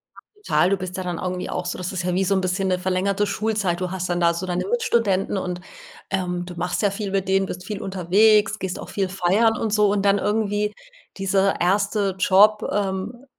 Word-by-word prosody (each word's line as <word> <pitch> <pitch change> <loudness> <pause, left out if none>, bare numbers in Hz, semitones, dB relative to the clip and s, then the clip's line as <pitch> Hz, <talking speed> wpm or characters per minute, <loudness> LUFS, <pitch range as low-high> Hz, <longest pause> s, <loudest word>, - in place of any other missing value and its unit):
Ja, - - -15 0.2
total. 185 - +2
Du 200 - +1
bist 185 -1 -6
ja 185 - -3
dann 175 -2 -3
irgendwie 180 0 -3
auch - - -3
so 180 - -3
das 180 -1 -4
ist 185 -2 -3
ja 180 - -1
wie 190 +2 +1
so 195 +1 +1
'n 190 - +1
bisschen 185 +1 -1
'ne 180 -1 +1
verlängerte 190 +2 0
Schulzeit. 205 -5 -1
Du 180 - -2
hast 185 -1 -3
dann 175 - 0
da 170 -1 +3
so 170 +2 -4
deine 180 -1 -2
Mitstudenten 230 - +1
und, 180 -1 -4 0.5
ähm, 180 -2 -2
du 180 - -9
machst 175 +1 -2
sehr 205 -2 +2
viel 200 0 -4
mit 195 -1 -1
denen, 195 0 +2
bist 180 -1 -7
viel 205 0 -5
unterwegs, 205 +4 +3
gehst 190 -1 -4
auch - - -8
viel 195 -2 -1
feiern 195 +5 +2
und 220 -2 -2
so. 210 -1 +4
Und 205 -1 0
dann 200 0 +4
irgendwie 210 0 0 0.4
dieser 195 0 +1
erste 200 +1 +1
Job, 205 +3 +5
ähm, 200 +5 -3
190 Hz, 225 wpm, -23 LUFS, 180-205 Hz, 0.5 s, Job